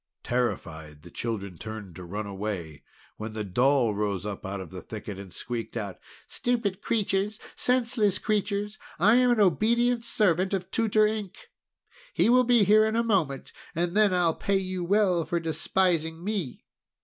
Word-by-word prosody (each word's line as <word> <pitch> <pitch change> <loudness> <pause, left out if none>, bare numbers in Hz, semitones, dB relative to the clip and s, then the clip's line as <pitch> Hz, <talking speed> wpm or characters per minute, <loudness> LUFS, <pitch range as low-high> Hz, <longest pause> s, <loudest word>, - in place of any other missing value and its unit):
Terrified, 80 -11 -3
the 85 - -13
children 100 -7 -4
turned 110 -5 -7
to 90 - -8
run 100 +5 -5
away, 95 -8 -5 0.3
when 110 0 -6
the 110 -1 -3
doll 120 +3 +2
rose 100 -2 -2
up 105 -2 -5
out 100 +1 -4
of 95 -3 -8
the 95 -1 -7
thicket, 105 0 -7
and 100 -2 -10
squeaked 120 +3 -5
out: 100 -3 -5 0.3
"Stupid 225 -6 -1
creatures! 210 -1 0 0.2
Senseless 235 -5 +1
creatures! 210 -1 -1 0.2
I 210 +8 +5
am 250 0 +4
an 240 -2 +3
obedient 235 +5 +3
servant 195 -5 +2
of 185 0 -5
Tutor 215 -1 +3
Ink! 210 -3 -4 0.6
He - - +3
will 250 +1 +5
be 240 -3 +5
here 210 +2 +6
in 220 0 0
a 230 - +2
moment, 175 - 0 0.2
and 170 +2 -1
then 210 -2 +5
I'll 175 -3 +2
pay 200 +4 0
you 185 -1 -3
well 185 -2 +2
for 170 +2 -1
despising 165 0 0
me!" 195 - -3
175 Hz, 165 wpm, -27 LUFS, -, 0.6 s, here